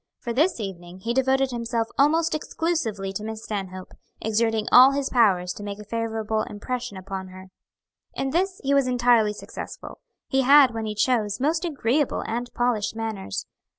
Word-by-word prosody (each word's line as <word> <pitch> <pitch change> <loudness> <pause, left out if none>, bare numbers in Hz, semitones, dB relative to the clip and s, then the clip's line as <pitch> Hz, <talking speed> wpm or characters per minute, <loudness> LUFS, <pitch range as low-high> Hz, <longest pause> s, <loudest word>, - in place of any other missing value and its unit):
For 235 - -5
this 305 +4 +2
evening 185 -3 -7
he 230 +4 -1
devoted 265 +1 +2
himself 235 -1 -2
almost 320 +4 +3
exclusively 280 - -2
to 210 - -4
Miss 220 0 -6
Stanhope, 190 -3 -5 0.3
exerting 220 0 0
all 260 +2 +8
his 280 -1 -2
powers 190 -7 +3
to 205 - -9
make 200 -1 -5
a 210 - -9
favorable 220 0 -2
impression 215 0 -5
upon 190 0 -6
her. 185 0 -12 0.7
In 270 0 -2
this 370 +4 0
he 275 +1 +1
was 275 -2 +3
entirely 240 -3 +3
successful. - - -9 0.3
He 270 -1 +2
had, 270 -1 +6
when 225 -1 -3
he 210 - -4
chose, 215 -2 +1
most 320 +6 0
agreeable 285 -3 0
and 240 +2 -3
polished 240 -4 0
manners. 220 - -4
230 Hz, 165 wpm, -24 LUFS, 210-265 Hz, 0.7 s, all